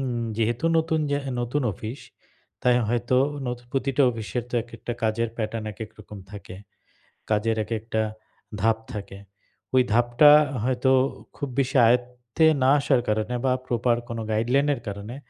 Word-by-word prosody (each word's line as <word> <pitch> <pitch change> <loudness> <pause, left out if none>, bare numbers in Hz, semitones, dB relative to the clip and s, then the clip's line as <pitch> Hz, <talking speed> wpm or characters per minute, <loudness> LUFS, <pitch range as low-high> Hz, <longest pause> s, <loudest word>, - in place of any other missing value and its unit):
উম 120 -3 -2
যেহেতু 115 +6 -1
নতুন 160 0 0
জা 145 - +1 0.2
নতুন 125 +4 -1
অফিস 110 +8 -7 0.6
তাই 125 -1 +4
হয়তো, 120 +2 +1 0.3
নতু 125 0 -4
প্রতিটা 135 0 +1
অফিসের 115 +1 -4
তো - - -5
একেকটা 120 0 -7
কাজের 110 +1 0
প্যাটার্ন, 110 0 -3
একেক 110 +2 -8
রকম 105 -1 -11
থাকে। 100 -2 -9 0.8
কাজের 110 +1 +1
একেকটা 110 0 -2 0.6
ধাপ 110 0 +3 0.2
থাকে। 100 -1 -7 0.6
ওই 130 - +7
ধাপটা 120 +5 +6 0.3
হয়তো 130 +1 +1 0.4
খুব 145 - -4
বেশি 130 0 0
আয়ত্তে 125 +4 +1 0.2
না 130 - +5
আসার 135 -3 +2
কারণে, 110 +3 0
বা 130 - +3 0.2
প্রপার 120 0 +1
কোন 115 - -4
গাইডলাইন 125 +6 +2
এর 120 - -10
কারণে 100 +4 -6
120 Hz, 145 wpm, -25 LUFS, 110-125 Hz, 0.8 s, ওই